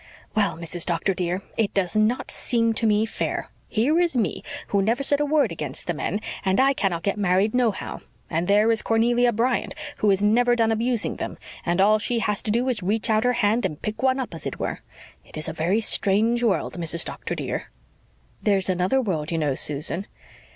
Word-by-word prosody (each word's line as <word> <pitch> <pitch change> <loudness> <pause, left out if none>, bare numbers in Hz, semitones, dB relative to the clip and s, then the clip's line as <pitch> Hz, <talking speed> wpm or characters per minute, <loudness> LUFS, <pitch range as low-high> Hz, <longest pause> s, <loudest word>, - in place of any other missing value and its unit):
"Well, 205 -5 +1
Mrs. 170 0 -4
Doctor, 175 +2 0
dear, 180 +1 -2
it 220 -3 0
does 195 0 0
NOT 215 +4 +1
seem 230 -2 +1
to 225 0 +1
me 210 +1 +3
fair. 225 - -3 0.2
Here 270 +9 +2
is 340 -7 +1
me, 225 - 0 0.3
who 200 - +2
never 230 +7 +1
said 285 +1 +3
a 295 - +1
word 300 0 +2
against - - -4
the - - -1
men, 210 - -3 0.2
and 190 0 +1
I 270 +1 +4
cannot 180 -9 -1
get 200 +1 -1
married 195 +2 +2
nohow. 240 -6 -1 0.3
And 170 +1 -1
there 210 +3 +4
is 225 - +1
Cornelia 240 +2 +2
Bryant, 235 +3 0 0.2
who 210 - +2
is 195 0 +2
never 240 +3 +4
done 225 -1 +2
abusing 230 +1 0
them, - - -5 0.3
and 175 +1 0
all 210 +2 +5
she 235 +2 -1
has 210 -2 0
to - - -5
do 235 +4 +1
is 255 -3 +1
to 180 - -8
reach 220 +2 +1
out 215 0 +3
her 250 0 +2
hand 225 0 +1
and 150 - -2
pick 215 0 -5
one 260 0 +2
up, 260 - -4
as - - -5
it - - -5
were. - - -3 0.4
It - - -11
is 155 - 0
a 160 - -3
very 170 +7 +1
strange 220 +2 +2
world, 190 -6 0
Mrs. 170 0 +1
Doctor, - - -5
dear." - - -4 0.7
"There's 195 -2 +1
another 185 +8 +1
world, 170 -11 -2
you 165 - 0
know, 150 -3 +1
Susan." 150 +8 -1
215 Hz, 215 wpm, -24 LUFS, 185-235 Hz, 0.7 s, all